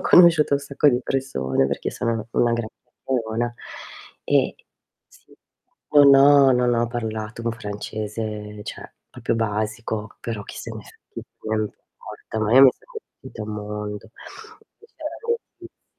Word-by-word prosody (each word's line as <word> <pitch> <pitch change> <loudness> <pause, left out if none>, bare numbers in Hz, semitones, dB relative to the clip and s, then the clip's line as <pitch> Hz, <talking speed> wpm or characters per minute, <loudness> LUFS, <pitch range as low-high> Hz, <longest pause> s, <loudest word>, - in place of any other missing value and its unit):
conosciuto 165 -5 +6
un - - +2
sacco 140 +1 +2
di 125 -2 +2
persone, 65 - 0
perché 70 - -3
sono 115 - -2
una 110 -2 -4
una 120 -1 +2
gran 115 -2 -3
chiacchierona, 120 -2 -3 0.7
ehm, - - +2 0.6
sì, - - -22 0.6
non 145 -2 +8
ho 140 0 +7
non 125 -1 +2
ho 120 0 +1
parlato 110 -1 -5
un 115 - 0
francese 105 0 -5
cioè - - -8 0.2
proprio - - -2
basico, 110 0 -3
però 110 -3 -4
chissenefrega, - - -10 0.3
non 110 0 +1
importa, 110 +1 -8
ma 110 +1 0
io 135 - +9
mi 135 - +9
sono - - -23 0.3
divertita 130 -4 -9
un 105 - -7
mondo, 105 -1 -6 0.7
che - - -19
c'erano 465 -7 -7
115 Hz, 135 wpm, -23 LUFS, 105-135 Hz, 0.7 s, io